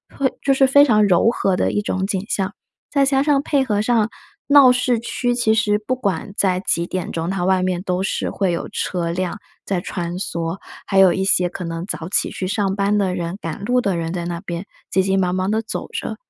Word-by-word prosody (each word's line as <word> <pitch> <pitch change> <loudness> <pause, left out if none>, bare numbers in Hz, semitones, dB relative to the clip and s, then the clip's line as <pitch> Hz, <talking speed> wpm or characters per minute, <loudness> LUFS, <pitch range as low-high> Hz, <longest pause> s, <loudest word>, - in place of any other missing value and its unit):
会 270 -2 +1
就 275 - +3
是 270 0 +4
非 285 +2 +6
常 215 -6 +4
柔 185 +4 +4
和 195 -5 0
的 - - 0
一 210 - 0
种 190 -2 -2
景 195 -1 -2
象。 195 0 -1 0.4
再 280 -1 +2
加 270 0 +2
上 285 -1 +2
配 280 -2 +1
合 210 -4 0
上 225 -1 +2 0.4
闹 280 -3 +7
市 250 -1 +1
区 245 +1 -1
其 230 -3 +2
实 215 -2 +2
不 215 +5 -3
管 200 -5 -3
在 185 -2 +2
几 170 -3 0
点 185 0 -4
钟， 165 +1 -3
它 190 -2 -2
外 190 0 +3
面 185 -1 -1
都 180 -1 -1
是 195 - -1
会 195 -3 0
有 170 - -4
车 170 -2 -2
辆 180 +2 -3 0.3
在 190 -3 -1
穿 175 -1 -4
梭， 170 -2 -3 0.3
还 195 - -1
有 190 -2 +7
一 190 - -1
些 180 -2 +2
可 180 0 -6
能 165 +1 -4
早 165 -4 -5
起 - - +1
去 185 - -4
上 195 -1 0
班 200 +1 +2
的 190 -3 +1
人， 175 0 -4
赶 165 +4 -5
路 250 +2 +2
的 195 -6 0
人 165 0 -3
在 175 -2 -3
那 170 -1 -4
边 175 -1 -5 0.2
急 190 - +2
急 195 0 +1
忙 180 -1 +1
忙 185 +2 0
地 220 +1 +1
走 220 - -5
着。 - - -4
195 Hz, 250 characters per minute, -20 LUFS, 180-225 Hz, 0.4 s, 闹